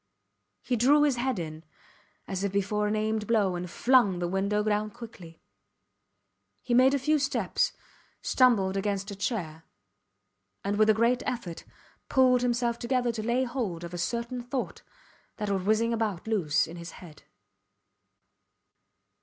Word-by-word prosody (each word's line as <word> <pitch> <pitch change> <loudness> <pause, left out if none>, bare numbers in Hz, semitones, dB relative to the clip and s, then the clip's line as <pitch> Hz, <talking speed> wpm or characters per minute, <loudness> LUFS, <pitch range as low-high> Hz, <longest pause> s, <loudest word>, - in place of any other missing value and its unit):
He 250 - 0
drew 280 +6 +5
his 285 -4 +2
head 255 -1 -1
in, 160 -2 -6 0.6
as 190 0 -3
if 200 - 0
before 205 +1 0
an 210 - 0
aimed 215 0 -1
blow, 205 -5 +2
and 175 0 -5
flung 235 -2 +3
the 175 0 -1
window 200 +3 0
down 210 0 0
quickly. 200 -8 -12 1.2
He 245 - -1
made 260 +3 +5
a - - +2
few 300 +3 +1
steps, 285 0 0 0.5
stumbled 215 -7 +3
against 200 0 -2
a - - -6
chair, 175 -7 -3 1.0
and 205 +1 -1
with 215 0 +5
a 215 - +5
great 235 +3 +2
effort, 200 -9 -4 0.4
pulled 255 -2 +4
himself 240 -1 0
together 245 0 0
to 225 -1 -4
lay 240 +4 +1
hold 235 -10 -3
of 170 +1 -7
a 175 - -4
certain 235 +6 -2
thought 250 +2 -4 0.6
that 210 -2 -2
was 195 -1 0
whizzing 220 +4 +2
about 215 -6 -2
loose 160 -9 +1
in 165 +2 -9
his 170 0 -8
head. 165 -5 -13
215 Hz, 155 wpm, -28 LUFS, 190-245 Hz, 1.2 s, drew